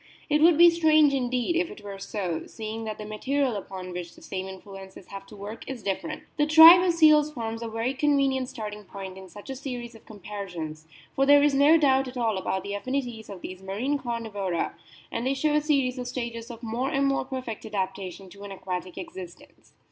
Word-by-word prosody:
It 300 0 +3
would 330 -1 +6
be 345 +1 +8
strange 310 -3 +4
indeed 250 +3 0
if 340 0 +1
it 210 - -11
were 200 -1 -7
so, 185 -5 -4
seeing 220 0 -6
that 215 -1 -4
the 210 - -7
material 255 +4 -1
upon 190 -2 -6
which 175 -1 -7
the - - -16
same 190 0 -5
influences 190 0 -11
have 195 0 -9
to 215 - -13
work 205 +3 -8
is 255 -5 -6
different. 200 +11 -3
The 295 -1 +2
tribe 325 +3 +10
of 360 -1 +2
seals 305 -2 +5
forms 225 -4 -5
a 230 - -4
very 225 +3 -2
convenient 270 -2 +1
starting 210 -5 -7
point 190 -1 -8
in 190 -1 -11
such 205 +8 -10
a - - -5
series 250 -3 -6
of 225 - -17
comparisons, 180 -7 -7 0.3
for 270 0 +2
there 285 0 +7
is 295 -1 +3
no 285 +4 +6
doubt 270 -3 +3
at 255 0 -8
all 225 -5 0
about 190 0 -2
the 200 - -5
affinities 240 0 -3
of 195 -3 -8
these 185 0 -8
marine 225 +10 -2
Carnivora, 215 -8 -3 0.4
and 230 - -3
they 270 - +1
show 295 +2 +1
a 300 - +3
series 275 -4 +1
of 250 - -4
stages 235 -2 -5
of 235 0 -10
more 235 +4 -2
and 275 0 +1
more 275 0 +1
perfect 255 -4 -6
adaptation 190 -2 -4
to 200 - -14
an 200 - -8
aquatic 185 -1 -5
existence. 185 -2 -11
230 Hz, 210 wpm, -26 LUFS, 195-275 Hz, 0.4 s, tribe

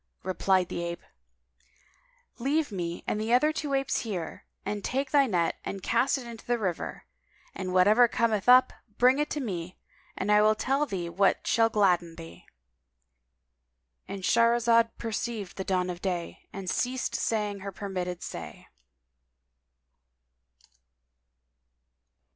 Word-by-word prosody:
Replied 185 0 +1
the 170 - -3
ape, 170 0 -5 1.4
"Leave 285 +3 0
me 175 -3 -4
and 210 - -1
the 220 +2 -2
other 300 +5 +4
two 290 -3 -2
apes 270 0 0
here, 185 -8 -5 0.2
and 205 -1 -3
take 270 +1 -2
thy 280 -2 +4
net 175 -6 0
and 195 -2 -6
cast 250 +4 +2
it 260 - -8
into 235 -1 -9
the 240 0 0
river; 185 -7 -4 0.5
and 185 -1 -4
whatever 210 +7 +5
cometh 225 -1 0
up, 255 +1 +7 0.2
bring 255 +3 +5
it 295 - 0
to 300 - -2
me, 185 -8 -5 0.4
and 200 +2 -1
I 210 0 +6
will 215 0 +4
tell 275 +6 0
thee 180 -6 -3
what 190 +3 +1
shall 225 -1 +3
gladden 180 -6 +2
thee."—And 60 - -16
Shahrazad 230 +1 +4
perceived 225 -3 -4
the 190 - -2
dawn 185 -1 0
of 175 0 -8
day 175 -3 -4
and 195 -1 -7
ceased 250 +6 -1
saying 210 -3 -1
her 195 +1 -6
permitted 180 -2 -4
say. 85 -2 -8
200 Hz, 135 wpm, -28 LUFS, 175-235 Hz, 1.4 s, up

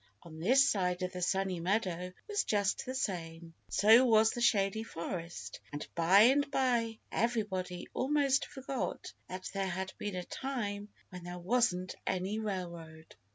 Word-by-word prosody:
On 160 -2 -11
this 260 +11 +5
side 180 -2 0
the 180 - -5
Sunny 190 0 0
Meadow 180 -1 -1 0.2
was 415 -1 0
just 205 +1 0
the 255 - -3
same; 165 -8 -4 0.2
so 220 +5 +6
was 225 -3 +5
the 240 - -5
Shady 210 -2 +2
Forest, 170 -4 -6
and 145 0 -5
by 175 +4 +5
and 275 +5 +5
by 240 -5 +1
everybody 205 -6 -1
almost 280 0 +2
forgot 270 -2 -4 0.2
that 185 0 -6
there 195 -1 -1
had 190 +1 -4
been 205 -2 -3
a 180 - -3
time 210 -5 -4 0.2
when 180 -1 -8
there 175 0 -6
wasn't 185 -2 +1
any 190 +4 -1
railroad. 170 -6 -6
195 Hz, 150 wpm, -32 LUFS, 180-235 Hz, 0.2 s, so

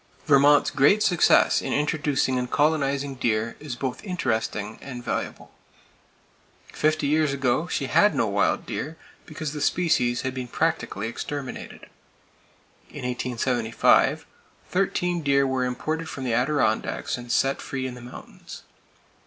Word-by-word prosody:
Vermont's 145 -1 +5
great 175 +10 +4
success 175 -5 +4
in - - -3
introducing 145 -3 0
and 125 0 -3
colonizing 140 -2 +1
deer 115 -3 -1
is 145 -5 -6
both 130 0 -4
interesting 110 - -2
and 125 -3 -8
valuable. - - -4 1.2
Fifty 155 -1 +1
years 150 0 +2
ago, 140 +4 0
she 140 - -2
had 205 +9 +3
no - - +2
wild 100 -1 0
deer, 160 +4 -5 0.3
because 155 -2 -5
the 150 - -5
species 125 -10 +1
had 130 -1 -3
been 130 -1 -5
practically 160 -8 -1
exterminated. 135 +3 -6 1.1
In - - -8
1875, 125 -2 +1 0.5
thirteen 180 -2 0
deer 140 -2 +3
were 130 -1 0
imported 155 +6 -3
from 135 - -6
the 125 -3 -1
Adirondacks 125 -2 0
and 120 -1 -7
set 135 +1 +1
free 130 -1 -4
in 130 - -4
the 125 - -11
mountains. 120 +1 -11
135 Hz, 135 wpm, -25 LUFS, 125-155 Hz, 1.2 s, Vermont's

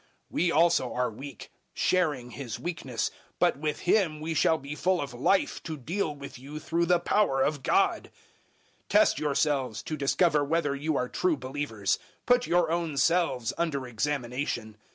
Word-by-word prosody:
We 175 0 +1
also 165 -6 +3
are 125 -1 0
weak, 135 +6 -10 0.2
sharing 150 -9 +1
His 125 -2 -6
weakness, 145 -9 -3 0.3
but - - +2
with 150 0 -2
Him 175 -5 +2
we 160 +2 -3
shall 160 +1 +3
be 140 0 -7
full 185 +4 +1
of 140 -3 -4
life 135 +11 +1
to 160 -3 -5
deal 155 +3 -2
with 140 -3 -9
you 140 +4 -8
through 170 +2 0
the 175 0 +4
power 170 -7 +2
of 145 -1 0
God. - - +2 0.8
013:005 - - -46
Test - - +4
yourselves 140 -5 0
to 155 - -3
discover 150 +2 +2
whether 145 -1 0
you 150 +1 -1
are 125 - 0
true 165 +4 0
believers: 130 -7 -2 0.3
put 245 0 +3
your 175 -2 +2
own 165 -4 -1
selves 135 -6 +2
under 145 -6 -1
examination. 125 -2 -2
150 Hz, 165 wpm, -28 LUFS, 130-165 Hz, 0.8 s, the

